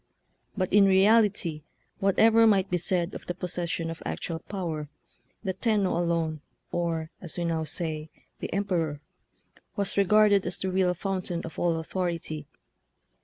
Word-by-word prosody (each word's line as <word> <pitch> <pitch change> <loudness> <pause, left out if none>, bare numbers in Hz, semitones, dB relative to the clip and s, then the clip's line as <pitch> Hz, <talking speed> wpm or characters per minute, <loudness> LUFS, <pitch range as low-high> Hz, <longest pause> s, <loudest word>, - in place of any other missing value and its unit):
But 185 -2 -1
in 205 -1 +7
reality, 195 -4 +4 0.4
whatever 225 +3 +5
might 195 -3 +3
be 180 - +2
said 180 +1 0
of - - -9
the 175 - -3
possession 175 -2 -3
of 165 - -8
actual 165 -1 -3
power, 160 -5 -4 0.5
the 190 -3 -1
Tenno 200 -2 +1
alone, 165 -3 0 0.3
or, 165 -2 -2
as 175 -1 -4
we 175 - -1
now 165 -1 -1
say, 155 0 -4 0.3
the - - -5
Em 200 +1 0
peror, 165 -6 -1 0.8
was 200 -1 -1
regarded 205 0 +5
as 180 - -3
the 190 - -2
real 185 -1 +2
fountain 185 -2 -2
of 165 -3 -8
all 170 -2 +2
authority. 165 -3 -3
180 Hz, 150 wpm, -27 LUFS, 165-195 Hz, 0.8 s, in